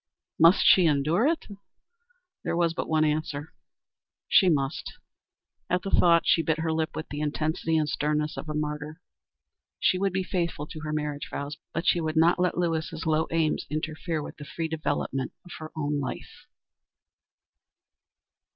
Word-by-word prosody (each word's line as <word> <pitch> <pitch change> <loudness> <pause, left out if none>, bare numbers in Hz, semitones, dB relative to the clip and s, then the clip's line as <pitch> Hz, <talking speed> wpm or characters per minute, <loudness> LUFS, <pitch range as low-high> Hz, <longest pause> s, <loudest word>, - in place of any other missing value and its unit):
Must 165 +4 +6
she 180 -3 +7
endure 155 - +2
it? 330 +1 0 1.0
There - - -1
was 170 -1 +2
but - - -4
one 155 -1 +3
answer: 150 -1 -2 0.7
She 190 - +5
must. 140 -3 -1 0.8
At 180 +1 +1
the 195 - -4
thought 170 -1 +5
she 165 - +4
bit 160 -1 0
her 160 -1 0
lip 160 0 -2
with 155 - -5
the 145 - -5
intensity 155 +2 0
and 155 -1 +1
sternness 150 +1 -1
of 155 - -7
a 150 - -3
martyr. 150 +1 -4 0.8
She 185 - +2
would 195 0 +1
be 190 +1 -1
faithful 170 -5 -2
to 155 - -9
her 155 0 -5
marriage 150 -1 -3
vows, 145 +2 -5
but 165 +2 -3
she 175 -2 +3
would 160 0 -2
not 170 +3 +4
let 180 -1 +1
Lewis's 165 -2 -1
low 160 0 +2
aims 165 -2 0
interfere 155 +1 -3
with - - -9
the 150 - -8
free 165 +2 -4
development 150 -4 -2
of 180 - -13
her 155 0 -8
own 145 -1 -1
life. 130 -2 -7
155 Hz, 165 wpm, -27 LUFS, 150-170 Hz, 1.0 s, she